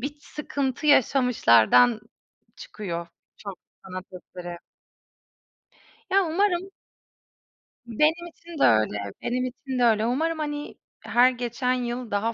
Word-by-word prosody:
bir 285 Hz, +4 st, -5 dB
sıkıntı 285 Hz, -2 st, -4 dB
yaşamışlardan 245 Hz, -, +4 dB, 0.6 s
çıkıyor 170 Hz, -5 st, -6 dB, 0.3 s
çok 200 Hz, -4 st, -9 dB, 0.3 s
sanat 185 Hz, 0 st, -7 dB
eseri. 175 Hz, -1 st, -9 dB, 1.5 s
Ya, 390 Hz, 0 st, +3 dB
umarım. 365 Hz, +2 st, 0 dB, 1.2 s
Benim 310 Hz, +9 st, +1 dB
için 335 Hz, -2 st, -12 dB
de -, -, +3 dB
öyle, 110 Hz, -2 st, +3 dB, 0.2 s
benim 250 Hz, +1 st, -1 dB
için 255 Hz, +1 st, -5 dB
de -, -, +3 dB
öyle. 220 Hz, -2 st, +3 dB
Umarım, 315 Hz, +7 st, -1 dB
hani, 295 Hz, -1 st, -5 dB, 0.2 s
her 245 Hz, +1 st, +4 dB
geçen 250 Hz, +1 st, -2 dB
yıl 245 Hz, -1 st, -4 dB
daha 220 Hz, +3 st, 0 dB
250 Hz, 110 wpm, -25 LUFS, 210-295 Hz, 1.5 s, yaşamışlardan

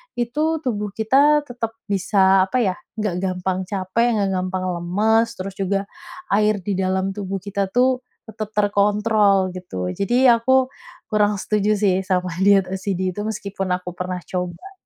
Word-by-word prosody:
itu 300 Hz, +7 st, 0 dB
tubuh 210 Hz, -5 st, -2 dB
kita 285 Hz, +7 st, +4 dB
tetap 230 Hz, -2 st, -5 dB, 0.2 s
bisa, 190 Hz, 0 st, +4 dB
apa 225 Hz, -, -1 dB
ya, 190 Hz, -3 st, 0 dB, 0.2 s
enggak 210 Hz, -4 st, -1 dB
gampang 185 Hz, 0 st, -1 dB
capek, 200 Hz, +4 st, 0 dB
enggak 200 Hz, -2 st, +1 dB
gampang 185 Hz, 0 st, -3 dB, 0.2 s
lemes, 215 Hz, +6 st, +2 dB
terus 190 Hz, +1 st, -5 dB
juga 195 Hz, +1 st, 0 dB, 0.5 s
air 210 Hz, 0 st, +3 dB
di 200 Hz, -, -1 dB
dalam 190 Hz, +1 st, 0 dB
tubuh 195 Hz, -1 st, -4 dB
kita 200 Hz, -1 st, -2 dB
tuh 255 Hz, +2 st, +3 dB, 0.3 s
tetap 215 Hz, -1 st, -6 dB
terkontrol 205 Hz, -1 st, +2 dB
gitu. 95 Hz, -, -4 dB
Jadi 240 Hz, -, +2 dB
aku 255 Hz, +3 st, +3 dB, 0.4 s
kurang 210 Hz, -1 st, +2 dB
setuju 210 Hz, 0 st, +1 dB
sih 190 Hz, -3 st, +2 dB
sama 185 Hz, -1 st, -1 dB
diet 195 Hz, -1 st, +5 dB
OCD 190 Hz, -1 st, -2 dB
itu 205 Hz, -, -3 dB
meskipun 200 Hz, -3 st, -4 dB
aku 180 Hz, 0 st, -6 dB
pernah 180 Hz, 0 st, -4 dB
coba. 180 Hz, -, -5 dB
200 Hz, 150 wpm, -21 LUFS, 185-220 Hz, 0.5 s, diet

